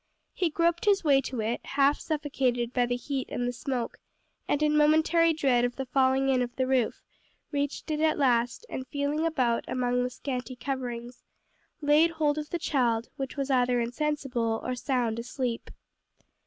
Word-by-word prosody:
He 355 - 0
groped 335 +3 +1
his 400 -2 +3
way 280 -3 +4
to 255 -4 -4
it, 225 +2 -2
half 280 +1 +2
suffocated 265 -6 -1
by 245 -1 +2
the 245 - 0
heat 265 +2 -4
and 245 0 -2
smoke, 245 -1 -3 0.5
and 290 +1 +1
in 300 0 +3
momentary 315 +2 +4
dread 270 -6 +2
of 245 0 0
the 270 - -4
falling 265 +1 +2
in 260 -1 +3
of 240 -1 -3
the 260 - 0
roof, 255 -3 0 0.5
reached 285 +2 -2
it 300 - -1
at 315 0 +2
last, 245 - +1
and 260 - -6
feeling 290 +4 -1
about 250 -7 +1
among 250 0 0
the 250 - -1
scanty 255 0 -5
coverings, 245 -2 -5 0.6
laid 300 +3 +5
hold 310 -2 0
of 300 0 -6
the 345 - -1
child, 240 -8 0
which 270 +1 -5
was 275 0 -1
either 250 -1 +3
insensible 245 -3 -1
or 255 - -2
sound 245 -3 -1
asleep. 240 0 -3
265 Hz, 170 wpm, -28 LUFS, 245-295 Hz, 0.6 s, laid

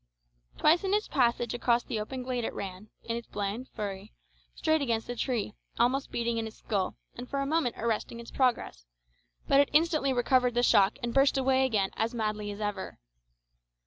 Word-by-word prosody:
Twice 330 +4 +4
in 390 +1 +2
its 425 - 0
passage 240 -3 +1
across 240 0 +2
the 230 -4 -3
open 255 +4 -5
glade 250 -1 -2
it - - -3
ran, 195 +2 -6
in 230 - -3
its 235 -1 -6
blind 205 +5 -3
fury, 200 - -6 0.4
straight 315 -1 +1
against 230 -4 -1
a - - -4
tree, 230 -4 -2 0.2
almost 255 +4 +2
beating 235 -1 -1
in 225 - -3
its 220 - -11
skull, 195 -4 -2 0.2
and 245 +1 -8
for 280 - -2
a 275 - 0
moment 300 -4 0
arresting 230 +1 -2
its 235 - -10
progress; 235 - 0 0.6
but 275 - +5
it 285 - +4
instantly 310 -3 +3
recovered 250 0 +2
the 240 - +2
shock 200 -3 +4
and 235 -1 -2
burst 275 0 +4
away 265 0 +3
again 205 -6 0
as 230 +2 -1
madly 215 -2 -2
as 205 0 -6
ever. 205 -2 -4
235 Hz, 190 wpm, -29 LUFS, 215-265 Hz, 0.6 s, but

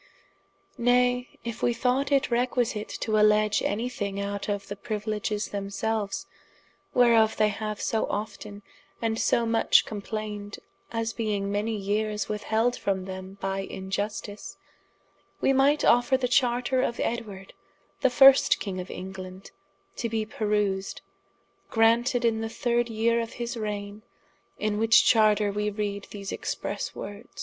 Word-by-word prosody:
] - - -40
Nay, 245 +1 +2
if 235 -1 -6
wee 240 - +2
thought 255 +4 0
it 275 -2 +2
requisite 240 -3 0
to 215 -1 +1
alleadge 210 0 +4
any 225 +4 -1
thing 200 -5 -4
out 200 +1 -3
of 200 -1 -2
the 205 - -5
priuiledges 210 0 -3
themselues, 200 +1 -2 0.7
whereof 230 -3 +5
they 215 0 +4
haue 215 +1 -4
so 220 +1 -1
often, 205 -1 -5 0.4
and 225 -1 -1
so 235 - +2
much 225 0 +4
complained, 210 -1 -5 0.3
as 230 0 -2
being 205 -3 -2
many 210 +2 -1
yeeres 210 +1 -1
withheld 220 +3 0
from 190 -4 -2
them 190 +1 -8
by 195 0 -2
iniustice, 205 +2 -5 0.8
wee 270 - +3
might 280 +3 +3
offer 245 +2 +4
the 255 -1 -1
charter 250 +1 +2
of 235 - -2
Edward 205 -5 -4 0.5
the 265 - +3
first 270 +2 +6
king 190 -3 -4
of 180 - -6
England, 185 0 -8 0.5
to 235 - -2
be 220 -1 -1
perused, 210 -3 -1 0.7
granted 235 +2 +3
in 225 -1 +1
the 225 - -3
third 240 +1 0
yere 230 +1 +1
of 230 - -6
his 240 0 -4
raigne: 210 -1 -5 0.6
in 210 0 -1
which 225 +1 +5
charter 215 -2 +4
wee 210 +1 -1
reade 205 -1 -4
these 200 -2 -6
expresse - - -4
wordes. 205 +5 -9
215 Hz, 140 wpm, -27 LUFS, 205-235 Hz, 0.8 s, first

